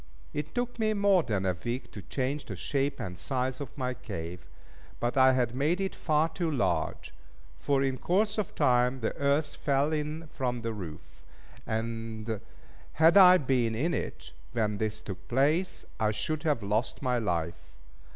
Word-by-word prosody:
It 150 +1 -4
took 245 0 -2
me 215 -1 +2
more 200 -2 +4
than 100 -9 -1
a 95 -2 +1
week 120 +2 -3
to 105 - -8
change 135 +7 -2
the 100 - -6
shape 140 - -1
and 90 -7 -5
size 130 0 -2
of 140 +1 -7
my 130 -2 -1
cave, 90 -7 -7 0.5
but 120 +2 -1
I 130 -1 +6
had 120 -2 +1
made 150 +8 +1
it 195 -1 -1
far 155 0 +2
too 165 +1 -2
large; 140 -5 -1 0.4
for 140 -1 +1
in 130 -2 -1
course 205 - +1
of 205 - -3
time 125 -2 +3
the 110 - -1
earth 145 +1 +1
fell 140 +1 +1
in 155 +2 -3
from 125 -5 -3
the 115 0 -2
roof; 85 -7 -9 0.4
and 110 -1 -3 0.5
had 165 +3 +5
I 185 -2 +9
been 125 -6 +1
in 160 +9 0
it, - - -4 0.2
when 105 -2 0
this 110 -1 -2
took 95 -3 -8
place, 150 +9 +1
I 110 - +3
should 110 +9 -2
have 150 -8 0
lost 105 +7 -1
my 125 -2 +2
life. 85 -4 -2
130 Hz, 170 wpm, -29 LUFS, 110-155 Hz, 0.5 s, I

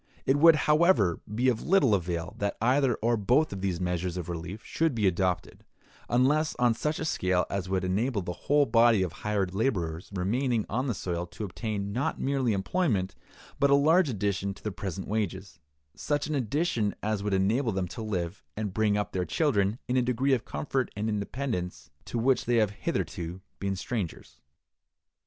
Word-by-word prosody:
It 135 - +3
would, 165 +2 +8
however, 150 - +4
be 120 +5 +1
of 120 -3 +2
little 165 - +3
avail 90 -1 -1
that 100 0 -1
either 125 +1 +3
or 120 +1 +3
both 120 +6 +2
of 95 - -6
these 95 -3 -1
measures 90 0 -2
of 90 -1 -5
relief 85 +5 -6
should 160 -5 0
be 110 -3 +1
adopted, 90 -1 0 0.5
unless 145 +6 +2
on 120 -1 +3
such 150 +7 -2
a 160 - -3
scale 90 - +1
as 95 -2 -2
would 95 -1 0
enable 100 +3 0
the 90 - -4 0.2
whole 145 0 +5
body 115 -4 +4
of 90 - -2
hired 100 0 -2
laborers 90 -7 -1
remaining 110 +5 0
on 125 +6 -1
the 120 - -1
soil 85 -1 -3
to 95 +5 -8
obtain 100 0 -4
not 125 +5 -1
merely 135 -3 +1
employment, 100 - 0 0.5
but 140 -1 +4
a 140 - +6
large 155 +3 +4
addition 100 -3 -1
to - - -17
the 105 - -2
present 95 0 -5
wages—such 95 - -4
an 155 - -3
addition 130 -4 0
as 105 -1 -1
would 100 -1 0
enable 110 +6 +1
them 95 -2 -2
to 115 - -7
live 95 -5 -3
and 105 -3 -3
bring 105 0 +2
up 105 - -2
their 90 - -1
children 105 - +1
in 125 - +1
a - - +4
degree 125 +3 +1
of 120 -3 0
comfort 110 - -2
and 105 +2 -2
independence 105 - -3
to - - -4
which 125 +2 +2
they 120 - +2
have 110 -3 +3
hitherto 90 -3 -3 0.2
been 100 0 -1
strangers. 95 -3 -5
105 Hz, 185 wpm, -28 LUFS, 95-125 Hz, 0.5 s, would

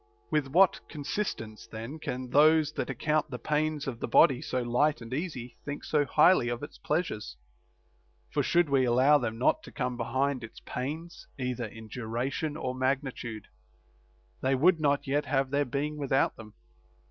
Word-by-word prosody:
With 150 -3 +1
what 180 +7 +4
consistence 145 - -4
then 115 +8 -7
can 125 -3 -5
those 155 +1 +5
that - - -3
account 155 -1 0
the 125 - -5
pains 150 +1 -1
of 125 -4 -4
the - - -3
body 135 -6 +5
so 125 -1 -2
light 120 +4 +2
and 115 +1 -8
easy 130 -6 -4
think 145 0 -5
so 150 -2 +1
highly 150 -2 +4
of 120 +2 -4
its 145 - -9
pleasures? 150 - -2 0.9
For - - +1
should 175 -1 +3
we 135 -2 +3
allow 130 +4 +5
them 115 -3 -3
not 130 - +2
to - - -12
come 125 -3 -3
behind 130 +2 -1
its 115 - -10
pains 155 +7 -5
either 125 -2 -2
in 110 +1 -10
duration 125 +7 -3
or 130 - -3
magnitude, 130 -4 -2 1.0
they 130 +1 +2
would 165 +6 +4
not 145 -2 +1
yet 145 +2 0
have 135 -2 0
their 145 0 +2
being 145 +4 -2
without 135 -1 +1
them. 110 -2 -12
135 Hz, 170 wpm, -29 LUFS, 125-150 Hz, 1.0 s, those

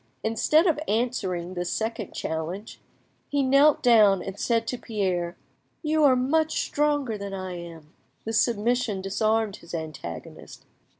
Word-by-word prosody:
Instead 235 - +3
of 325 -5 +2
answering 195 -6 -1
this 175 -1 -3
second 220 -2 -3
challenge, 165 +7 -5 0.5
he 285 -1 +1
knelt 275 +3 +4
down 215 -6 +6
and 195 +1 -7
said 230 -1 +1
to 250 - -2
Pierre— 185 -7 -2 0.5
"You 310 0 +2
are 265 -2 +6
much 310 +5 +1
stronger 290 -7 0
than 200 -1 -5
I 185 -1 -5
am." 165 -2 -11 0.3
This 225 0 +2
submission 230 -2 0
disarmed 215 +2 0
his 170 0 -8
antagonist. 155 - -8
220 Hz, 135 wpm, -26 LUFS, 185-250 Hz, 0.5 s, down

